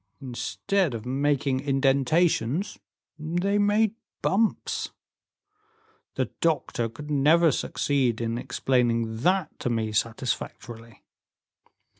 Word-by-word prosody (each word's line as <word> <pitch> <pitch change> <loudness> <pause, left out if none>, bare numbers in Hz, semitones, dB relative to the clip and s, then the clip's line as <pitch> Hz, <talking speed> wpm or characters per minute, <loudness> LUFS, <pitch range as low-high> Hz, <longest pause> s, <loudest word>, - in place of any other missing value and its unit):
Instead 140 +5 -1
of 115 0 -7
making 135 0 +1
indentations, 140 - +1 0.4
they 175 +6 0
made 205 +1 +3 0.3
bumps. 215 +3 0 1.3
The - - -1
doctor 145 -7 0
could 150 +7 -9
never 155 +4 +5
succeed 130 -3 0
in 115 0 -2
explaining 115 -4 0
that 180 +7 0
to - - -2
me 110 -2 -1
satisfactorily." 115 0 -4
135 Hz, 90 wpm, -26 LUFS, 115-165 Hz, 1.3 s, never